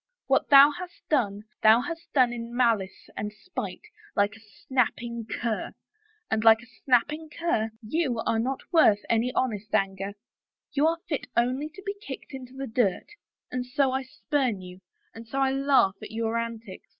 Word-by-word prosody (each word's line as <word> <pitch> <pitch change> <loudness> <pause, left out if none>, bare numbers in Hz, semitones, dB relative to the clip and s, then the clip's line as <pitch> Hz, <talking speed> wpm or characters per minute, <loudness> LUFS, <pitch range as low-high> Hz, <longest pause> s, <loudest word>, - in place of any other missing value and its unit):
What - - +2
thou 280 0 +9
hast 355 +3 -9
done 210 -8 +1 0.2
thou 220 +2 +7
hast 330 +3 -7
done 250 -4 +4
in 235 0 -6
malice 225 -6 +1
and 210 0 -3
spite, 360 - -6 0.3
like 205 +1 +2
a - - -14
snapping 235 +1 -2
cur, 230 -3 -3 0.6
and, 220 0 +1
like 225 +1 +6
a 240 -1 -21
snapping 295 +5 +2
cur, 305 -10 -1 0.2
you 265 0 0
are 225 - +1
not 260 +3 -1
worth 215 -11 +6
an 230 +2 +2
honest 215 -4 -1
anger; 195 0 -1 0.6
you 290 +3 +3
are 330 +1 +1
fit 295 - -3
only 255 +5 +1
to 385 +5 -13
be 400 - -1
kicked 275 -7 -8
into 255 -1 -8
the 270 0 -4
dirt 220 -5 0 0.4
and 250 0 -2
so 265 +2 +1
I 265 +1 0
spurn 260 -4 -1
you, 180 0 -11 0.3
and 225 0 -11
so 270 - -5
I 270 -1 +3
laugh 270 -8 +3
at - - -8
your 225 0 -2
antics 230 -4 -5
240 Hz, 175 wpm, -27 LUFS, 220-275 Hz, 0.6 s, thou